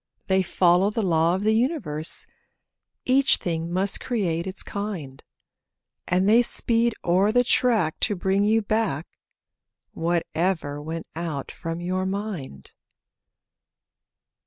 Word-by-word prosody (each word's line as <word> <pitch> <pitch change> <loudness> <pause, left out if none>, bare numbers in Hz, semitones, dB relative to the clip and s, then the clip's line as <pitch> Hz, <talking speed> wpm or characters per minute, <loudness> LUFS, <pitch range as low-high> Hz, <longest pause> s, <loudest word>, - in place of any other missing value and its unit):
They 190 0 +2
follow 180 +1 +3
the 220 +1 -2
law 165 -1 +2
of 190 - -3
the 215 +1 +3
universe— 220 - +1 0.8
Each 265 +1 +4
thing 165 -1 -3
must 190 +2 0
create 180 -8 -2
its 190 +1 -2
kind; 185 -10 -6 0.9
And 185 +2 +1
they 225 +3 +6
speed 235 -1 +1
o'er 185 +4 +3
the 245 +2 +3
track 225 -10 +1
to 210 - +1
bring 190 +2 +1
you 220 +1 +2
back 205 -8 -1 0.9
Whatever 165 -2 -1
went 160 +2 -5
out 160 -5 -4
from 165 +1 -6
your 185 +1 -2
mind. 190 - -6
185 Hz, 120 wpm, -24 LUFS, 165-215 Hz, 0.9 s, they